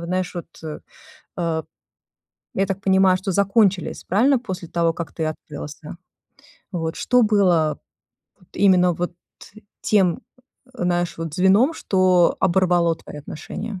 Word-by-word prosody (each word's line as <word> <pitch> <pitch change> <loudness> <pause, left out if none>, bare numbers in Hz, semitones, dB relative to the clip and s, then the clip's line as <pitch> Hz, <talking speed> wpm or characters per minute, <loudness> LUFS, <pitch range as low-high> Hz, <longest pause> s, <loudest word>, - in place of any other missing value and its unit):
вот 170 - -6
знаешь, 185 0 -2
вот, 175 - -6 0.2
э, 155 -1 -6 0.6
э, 165 -3 -1 0.9
я 195 +1 +1
так 195 0 -3
понимаю, 190 -1 +4
что 190 0 -3
закончились, 200 -1 +1
правильно, 250 +8 +3
после 185 -8 -7
того, 170 -1 +1
как 165 -3 -6
ты 160 -2 -3
открылся? 150 0 -8 0.8
Вот 165 -1 -3
что 250 0 +3
было 180 -8 +2 0.6
вот 180 - -25
именно 180 -3 +4
вот 175 +1 -4 0.7
тем, 190 -5 +2 0.5
знаешь, 175 -4 -1
вот 165 -2 -5
звеном, 195 - +4
что 185 -2 +2
оборвало 175 -2 +2
твои - - -12
отношения? 190 +7 -7
180 Hz, 130 wpm, -22 LUFS, 170-195 Hz, 0.9 s, понимаю